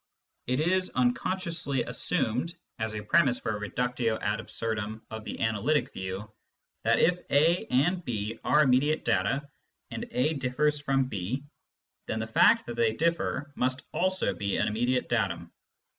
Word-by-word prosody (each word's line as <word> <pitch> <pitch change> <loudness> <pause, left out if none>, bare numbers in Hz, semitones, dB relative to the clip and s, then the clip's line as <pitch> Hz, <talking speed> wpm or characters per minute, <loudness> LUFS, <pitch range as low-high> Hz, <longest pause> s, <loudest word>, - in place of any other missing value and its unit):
It 125 +2 +1
is 185 +4 +2
unconsciously 155 +3 0
assumed, 130 +11 -1 0.2
as 110 -1 -2
a 105 - -4
premiss 125 +2 +3
for 105 - -2
a - - -5
reductio 120 +1 -1
ad 105 +1 -1
absurdum 110 -1 -4
of 110 0 -6
the - - -6
analytic 110 +7 +1
view, 95 +2 -5 0.6
that, - - +3
if 180 +1 +3
A 160 +5 +3
and 175 +8 +2
B 110 -3 -3
are 150 +1 +5
immediate 140 +3 +2
data, 140 +1 +1 0.4
and - - -5
A 140 +6 +1
differs 145 +2 0
from 135 -2 +1
B, 120 +4 -3 0.6
then - - -2
the 110 - -2
fact 110 - +4
that 120 0 -6
they 115 -2 +3
differ 160 -1 -1
must 130 0 -1
also 185 - +1
be 100 +2 -2
an - - +1
immediate 120 +4 0
datum. 90 -8 -1
125 Hz, 155 wpm, -28 LUFS, 110-150 Hz, 0.6 s, are